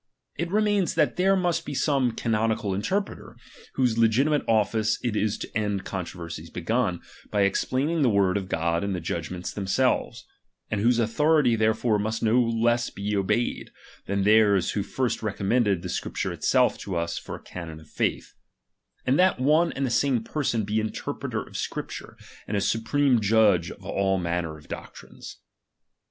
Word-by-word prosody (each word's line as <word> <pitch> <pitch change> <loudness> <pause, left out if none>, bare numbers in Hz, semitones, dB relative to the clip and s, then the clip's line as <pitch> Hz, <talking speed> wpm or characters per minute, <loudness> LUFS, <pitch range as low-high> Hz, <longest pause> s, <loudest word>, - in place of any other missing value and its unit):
It 170 +3 -3
remains, 205 -2 +1
that 150 -6 +2
there 190 +2 +3
must 175 -3 0
be 145 - -6
some 135 -5 +1
canonical 110 -3 0
interpreter, 190 - -3 0.4
whose 125 -4 +1
legiti 115 +6 +3
mate 150 - +2
office 110 0 +2
it 120 -3 -1
is 105 0 0
to - - -8
end 105 -3 -1
controversies 85 -3 -6
begun, 90 +1 -1 0.3
by 100 -1 +2
ex 100 0 +1
plaining 150 +6 0
the 130 - +4
word 100 -3 +2
of 95 -2 -3
God 85 +1 0
in 100 -1 -1
the 90 - -2
judgments 85 +2 -4
them 100 -2 -5
selves; 130 +6 0 0.5
and 105 -2 0
whose 120 +2 +3
authority 125 +3 +3
therefore 110 0 +1
must 110 +2 -2
be 110 - +3
no 125 +2 +5
less 120 +1 +1 0.2
obeyed, 105 +4 0 0.4
than 100 0 0
theirs 105 -3 +4
who 105 - -1
first 125 +4 -2
recommended 100 -2 0
the - - -4
Scripture - - -3
itself - - +2
to 95 - -5
us 85 0 -2
for - - -7
a - - -10
canon 80 -3 -8
of 80 - -17
faith; - - -2 0.7
and 130 +5 +2
that 185 -5 +4
one 155 +6 +3
and 135 - -1
the 125 - -2
same 125 -2 +2
person 120 -4 -1
be 105 +2 0
an 110 - -1
interpreter - - -4
of - - -16
^Scripture, - - -5 0.3
and 105 - -1
a - - 0
supreme 125 +4 +2
judge 105 -5 +3
of - - -11
all 95 -1 0
manner 85 -3 -2
of 75 - -17
^ioctrines. - - -9
110 Hz, 175 wpm, -26 LUFS, 100-130 Hz, 0.7 s, no